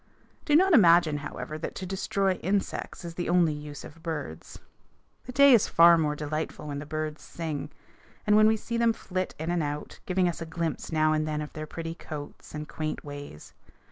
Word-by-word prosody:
Do 295 - +3
not 375 +3 +5
imagine, 170 - +6
however, 150 +1 -6
that - - -5
to 190 - -5
destroy 195 +1 0
insects 190 -1 -2
is 170 - -6
the 175 0 -3
only 175 -3 +4
use 150 -1 -8
of 160 +2 -12
birds. 150 - -6 0.7
The 250 - -6
day 280 +1 +7
is 230 - +5
far 170 +1 +7
more 150 -2 +1
delightful 150 0 -4
when 140 0 -3
the 145 - -8
birds 155 0 -4
sing, 160 -4 -5 0.6
and 210 -1 +4
when 215 0 +7
we 220 0 +3
see 235 +2 -4
them 230 -1 +3
flit 185 -4 -4
in 160 +2 -3
and 175 -1 +1
out, 145 0 -4
giving 185 -1 +2
us 175 -1 -3
a 165 - -4
glimpse 165 -1 -3
now 155 -1 +3
and 155 0 0
then 150 -1 -2
of 150 0 -6
their 155 0 -6
pretty 165 +1 -5
coats 150 -3 -9
and 150 0 -5
quaint 155 -1 -4
ways. 145 - -9
165 Hz, 205 wpm, -28 LUFS, 150-185 Hz, 0.7 s, day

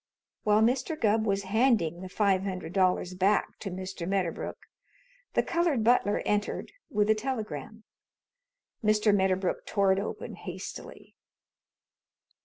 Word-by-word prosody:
While 210 0 +4
Mr. 265 +7 +1
Gubb 220 0 +2
was 200 0 +1
handing 195 -5 +2
the 185 - -7
five 195 -1 +2
hundred 185 -4 -5
dollars 185 -1 +2
back 195 +3 +1
to 200 - -5
Mr. 185 -1 -5
Medderbrook 190 -3 -2 0.8
the - - +4
colored 335 -9 +1
butler 225 -3 +3
entered 210 0 -1 0.2
with 210 -7 +1
a - - +7
telegram. 220 - -5 1.0
Mr. 210 -1 +4
Medderbrook 190 -1 +1
tore 200 -2 +2
it 190 - 0
open 200 - -5
hastily. - - -8
205 Hz, 125 wpm, -29 LUFS, 185-220 Hz, 1.0 s, a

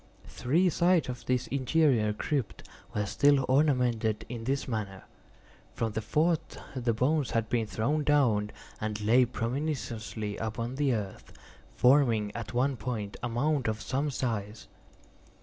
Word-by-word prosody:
Three 165 +9 +1
sides 175 -2 +2
of 125 -1 -7
this 125 -1 +1
interior 130 -4 +2
crypt 125 +2 -3 0.3
were 105 0 0
still 140 +5 +3
ornamented 125 -6 +2
in 115 -2 -6
this 135 +2 -1
manner. 105 -5 -4 0.7
From 115 -1 -1
the 110 - -3
fourth 155 +9 0 0.2
the 120 -2 0
bones 135 +5 +1
had 115 -1 -1
been 115 -2 0
thrown 145 +9 0
down, 120 -9 +3 0.3
and 105 -1 -3
lay 115 +4 +4
promiscuously 115 -4 -3
upon 115 +2 -3
the 140 -4 +2
earth, 100 -3 -6 0.4
forming 120 -6 +3
at 115 -2 -5
one 130 +2 +1
point 110 -6 -4
a 120 - -2
mound 135 +2 0
of 110 0 -1
some 140 +5 -1
size. 110 -5 -3
120 Hz, 140 wpm, -29 LUFS, 110-140 Hz, 0.7 s, lay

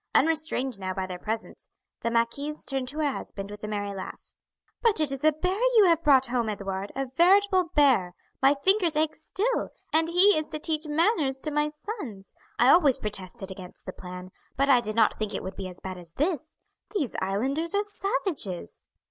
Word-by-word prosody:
Unrestrained 305 -7 +1
now 185 -1 -4
by 190 - -2
their 180 -1 -7
presence, 220 +3 -5 0.3
the 230 - 0
marquise 235 +6 -1
turned 270 -2 -2
to 285 +4 -5
her 300 -2 +1
husband 200 -5 -7
with 210 0 -10
a - - -3
merry 205 -1 -3
laugh. 190 -1 -9 0.5
"But 455 -7 +4
it 305 -3 +3
is 275 0 -4
a 310 - +6
bear 365 +6 -2 0.2
you 430 - +8
have 335 -2 +4
brought 275 -4 +5
home, 240 -3 -1
Edouard, 195 -1 -4
a 270 0 -1
veritable 370 +7 +4
bear 250 - +4 0.3
my 270 +2 +5
fingers 355 +2 +2
ache 310 0 +1
still 475 +5 -1 0.2
and 320 +1 +3
he 370 +4 +5
is 310 - -5
to 310 - -5
teach 310 0 -1
manners 300 - +1
to 305 - -3
my 295 0 +1
sons! 300 - -8 0.2
I 245 - +5
always 290 -5 +6
protested 195 -1 -3
against 185 -1 -9
the 185 - -6
plan, 180 0 -9 0.3
but 275 +1 +2
I 250 -3 +6
did 215 -2 -4
not 225 -2 +3
think 215 -1 -3
it - - -4
would 190 - -6
be 190 -1 -5
as 180 - -9
bad 185 -1 -6
as 170 -2 -11
this. 315 - -2 0.4
These 285 - -1
islanders 270 - -1
are 405 - +2
savages." 390 - -3
270 Hz, 200 wpm, -27 LUFS, 205-320 Hz, 0.5 s, you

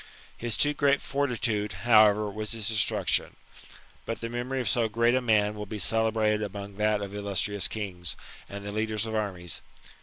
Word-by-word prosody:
His 120 -2 0
too 145 0 +3
great 140 -1 +2
fortitude, 115 -7 -1
however, 110 -2 +6
was 105 +2 -3
his 110 -3 -1
destruction. 110 -2 +2 0.7
But 115 - -3
the 115 - -4
memory 120 +3 -3
of 125 - -2
so 115 -3 +2
great 115 +2 +2
a 130 - +2
man 105 -3 +2
will 105 -1 -7
be 110 - -5
celebrated 110 +1 +1
among 100 -1 -6
that 105 -1 +1
of 100 0 -7
illustrous 100 0 -1
kings, 90 -5 -4 0.3
and 100 0 -7
the 100 - -4
leaders 110 0 -1
of 110 - -5
armies. 95 -6 -3
110 Hz, 175 wpm, -27 LUFS, 105-115 Hz, 0.7 s, however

